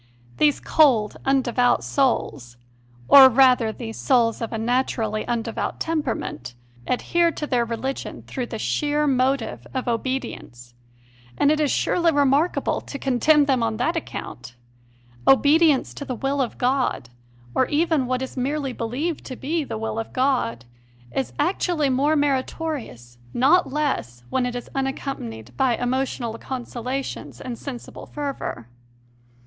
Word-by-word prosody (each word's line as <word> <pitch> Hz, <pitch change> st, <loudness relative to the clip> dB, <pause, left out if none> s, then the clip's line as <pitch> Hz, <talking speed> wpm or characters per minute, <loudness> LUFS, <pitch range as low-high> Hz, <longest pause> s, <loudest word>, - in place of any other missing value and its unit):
These 295 Hz, -1 st, +3 dB
cold, 245 Hz, -9 st, +3 dB
undevout 250 Hz, -2 st, +2 dB
souls 145 Hz, -, -1 dB, 0.5 s
or 270 Hz, -2 st, +10 dB
rather 250 Hz, -3 st, +4 dB
these 225 Hz, 0 st, -7 dB
souls 235 Hz, -4 st, +2 dB
of 230 Hz, -, -3 dB
a 225 Hz, -, -3 dB
natu 245 Hz, +5 st, 0 dB
rally 215 Hz, -2 st, -2 dB
undevout 235 Hz, -2 st, -2 dB
temperament 255 Hz, -, -3 dB, 0.3 s
adhere 340 Hz, +6 st, +2 dB
to 300 Hz, -, -4 dB
their 245 Hz, -5 st, +1 dB
re 230 Hz, 0 st, -3 dB
ligion 265 Hz, +2 st, -5 dB
through 250 Hz, -2 st, -4 dB
the 225 Hz, -, -5 dB
sheer 295 Hz, +6 st, 0 dB
motive 255 Hz, -, 0 dB
of 260 Hz, -, -2 dB
obedience, 230 Hz, -, -4 dB, 0.6 s
and 290 Hz, -, +4 dB
it 310 Hz, -, +1 dB
is 300 Hz, -2 st, +2 dB
surely 340 Hz, -2 st, +2 dB
remarkable 285 Hz, +3 st, +2 dB
to 280 Hz, -, -7 dB
condemn 280 Hz, +3 st, +3 dB
them 265 Hz, -3 st, +1 dB
on 225 Hz, -1 st, 0 dB
that 335 Hz, -, 0 dB
account! 125 Hz, -, -6 dB, 0.7 s
Obedience 295 Hz, +1 st, +4 dB
to -, -, -7 dB
the 260 Hz, -3 st, -4 dB
will 275 Hz, +3 st, -1 dB
of 250 Hz, -, -3 dB
God 250 Hz, -, 0 dB, 0.4 s
or 260 Hz, -, +2 dB
even 310 Hz, -3 st, +1 dB
what 255 Hz, +1 st, -1 dB
is 260 Hz, -, -7 dB
merely 275 Hz, +1 st, -2 dB
believed 265 Hz, +9 st, -3 dB
to 255 Hz, -, -6 dB
be 315 Hz, +5 st, -2 dB
the 260 Hz, -, -5 dB
will 225 Hz, 0 st, -3 dB
of 225 Hz, -, -5 dB
God 255 Hz, -, 0 dB, 0.5 s
is 270 Hz, -, -2 dB
actually 315 Hz, -2 st, +1 dB
more 285 Hz, +4 st, +2 dB
meritorious, 270 Hz, -, -2 dB, 0.2 s
not 275 Hz, +6 st, +4 dB
less, 260 Hz, -, -2 dB
when 255 Hz, -1 st, +1 dB
it 245 Hz, -, -5 dB
is 245 Hz, -, -5 dB
un 270 Hz, -1 st, 0 dB
accompanied 120 Hz, -, -6 dB
by 245 Hz, -, +2 dB
emotional 245 Hz, -2 st, -2 dB
consolations 255 Hz, +1 st, -5 dB
and 250 Hz, -2 st, -5 dB
sensible 255 Hz, -4 st, -8 dB
fervour. 275 Hz, -, -5 dB
260 Hz, 145 wpm, -23 LUFS, 230-285 Hz, 0.7 s, or